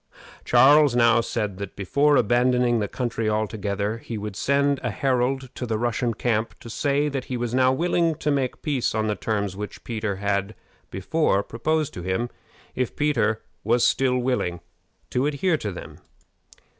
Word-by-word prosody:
Charles 145 -1 +5
now 115 -1 +5
said 105 -5 -3
that, 100 -1 -6
before 140 +10 +2
abandoning 120 0 +3
the 105 - -1
country 115 -2 -2
altogether, 105 0 -2
he 115 -1 -6
would 105 -1 -5
send 140 +3 +1
a 125 - -2
herald 130 +2 -1
to 125 - -5
the 110 -1 -1
Russian 120 0 -1
camp 115 -1 -1
to 115 - -9
say 145 +4 +1
that 135 -3 -3
he 125 - -3
was 120 -1 -3
now 130 0 +4
willing 170 +2 +1
to 150 - -1
make 135 -3 -1
peace 140 -7 0
on 110 0 0
the 105 - 0
terms 100 -4 -2
which 105 +1 -7
Peter 110 -4 -3
had 100 +1 -1 0.3
before 100 - 0
proposed 155 +7 -1
to 90 - -6
him, 95 +7 -2 0.4
if 125 -2 -2
Peter 115 -7 +1 0.2
was 120 +3 +3
still 130 -1 +2
willing 125 -9 -1 0.5
to 130 +3 +1
adhere 155 +3 +1
to 105 -7 -4
them. 90 - -10
120 Hz, 170 wpm, -24 LUFS, 105-135 Hz, 0.5 s, Charles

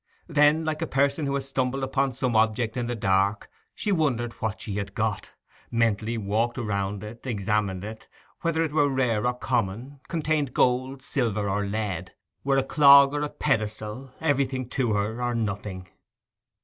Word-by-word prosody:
Then, 150 0 +4
like 155 -1 -2
a - - -1
person 140 +2 +1
who 140 - 0
has 135 -1 -3
stumbled 135 0 -1
upon 135 0 0
some 125 -1 -1
object 110 +1 +2
in 120 -2 -2
the 120 - -2
dark, 100 0 +1 0.2
she 210 - -2
wondered 130 - 0
what 110 -2 -2
she 100 -2 -4
had 100 -1 -4
got; 110 -4 -2 0.3
mentally 115 -1 0
walked 110 +4 -1
round 100 -3 -2
it, 110 +2 -9
estimated 105 -5 -1
it; 110 +1 -8 0.3
whether 165 -1 +1
it 160 - -2
were 145 -1 +3
rare 125 -4 +1
or 125 - 0
common; 120 +3 -2
contained 155 -5 -1
gold, 130 +2 +1
silver, 110 -7 -1
or 100 +1 -1
lead; 105 -1 -3 0.3
were 135 0 +2
a 135 - +3
clog 140 -1 +7
or 145 - -1
a 150 - -1
pedestal, 110 -1 -2
everything 135 -5 0
to 125 -4 0
her 105 +3 -1
or 120 -1 0
nothing. 100 -4 -3
120 Hz, 170 wpm, -26 LUFS, 105-140 Hz, 0.3 s, clog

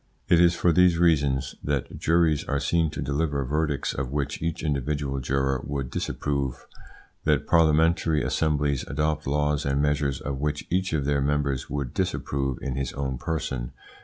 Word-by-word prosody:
It 85 -2 +6
is 85 -1 +5
for 85 - +3
these 90 0 +5
reasons 70 -6 +2
that 70 -3 -2
juries 80 -2 +2
are 70 -1 -1
seen 80 +1 +1
to 75 - -5
deliver 70 0 -1
verdicts 75 +1 -1
of 65 -2 -3
which 70 -1 -2
each 85 0 -2
individual 70 -1 -1
juror 65 +1 0
would 70 -3 -4
disapprove, 70 -3 -2 0.6
that - - +2
parliamentary 80 -1 +3
assemblies 75 -4 0
adopt 75 0 -1
laws 75 +1 +1
and 70 0 0
measures 70 -2 +1
of 70 -2 -4
which 75 +1 -2
each 95 +2 +1
of 75 -3 0
their 70 -1 +1
members 70 -2 0
would 70 -3 -3
disapprove 70 -2 -1
in 65 -1 -3
his 70 -2 -2
own 65 -2 -3
person. 65 -7 -3
70 Hz, 160 wpm, -26 LUFS, 70-80 Hz, 0.6 s, It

